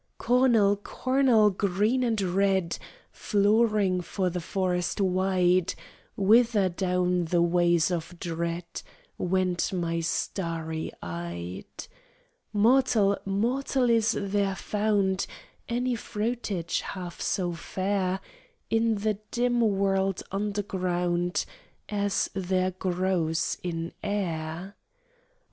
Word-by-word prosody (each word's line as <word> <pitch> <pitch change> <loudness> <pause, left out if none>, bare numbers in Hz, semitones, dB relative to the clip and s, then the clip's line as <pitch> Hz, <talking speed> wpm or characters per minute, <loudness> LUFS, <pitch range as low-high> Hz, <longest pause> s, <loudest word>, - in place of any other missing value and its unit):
"Cornel, 235 -5 +4
cornel, 250 -1 +3
green 205 +6 +1
and 230 -3 +1
red 190 -2 +1 0.3
Flooring 205 -2 +2
for 180 +1 -2
the 180 0 -3
forest 180 +1 -1
wide, 185 -1 +2 0.4
Whither 215 -1 +4
down 180 -1 0
the 170 +1 +2
ways 175 0 +3
of 170 0 -4
dread 170 0 -4 0.4
Went 180 -1 0
my 170 -3 -1
starry 165 -1 -3
eyed?" 85 +2 -6 0.7
"Mortal, 220 -2 +4
mortal, 245 +5 +1
is 225 0 +3
there 200 -1 0
found 205 -2 0 0.4
Any 245 +1 0
fruitage 210 -6 -2
half 180 -3 -7
so 180 -2 0
fair 190 +2 -1 0.5
In 225 0 +2
the 210 0 -1
dim 240 0 +1
world 195 -3 +1
underground 180 -3 -1 0.4
As 205 -1 0
there 185 -1 0
grows 180 -3 -1
in 170 -1 -4
air?" 180 -2 -3
190 Hz, 95 wpm, -27 LUFS, 175-210 Hz, 0.7 s, Cornel